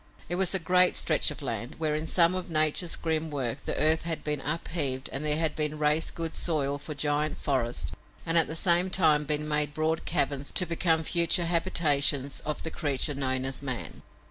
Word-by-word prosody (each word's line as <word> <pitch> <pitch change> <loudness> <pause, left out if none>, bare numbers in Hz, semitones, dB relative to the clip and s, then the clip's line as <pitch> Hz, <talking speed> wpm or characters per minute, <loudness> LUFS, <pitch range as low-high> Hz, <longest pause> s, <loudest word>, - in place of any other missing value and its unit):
It - - -3
was 190 +1 +1
a - - +4
great 180 +1 +3
stretch - - +1
of - - -6
land, 120 +4 -5
where, 155 -1 -1
in 155 +1 -3
some 170 +1 +3
of 185 -1 -4
nature's 155 +2 +2
grim 160 -1 -2
work, 135 -6 -4
the - - -2
earth 155 +1 +4
had 165 -2 -3
been 150 -2 -2
up 155 +4 -3
heaved 140 -5 -2
and 135 - -4
there 150 0 +1
had 160 -2 -1
been 155 0 -2
raised 150 +1 +1
good 165 -1 -4
soil 145 -4 +1
for 150 +1 -6
giant 145 +2 -1
forests, 125 -4 -2 0.3
and 165 - 0
at 165 - +5
the 160 - -6
same 175 +1 +3
time 155 -5 +3
been 150 +1 -1
made 150 -1 -1
broad 160 +1 -1
caverns 140 -1 -1
to 180 - +3
become 165 -1 0
future 170 +1 +2
habitations 150 -5 +1
of 150 - -3
the 160 - -3
creature 145 -1 0
known 130 -1 -1
as 135 0 -1
man. 125 - -6
155 Hz, 205 wpm, -27 LUFS, 145-165 Hz, 0.3 s, at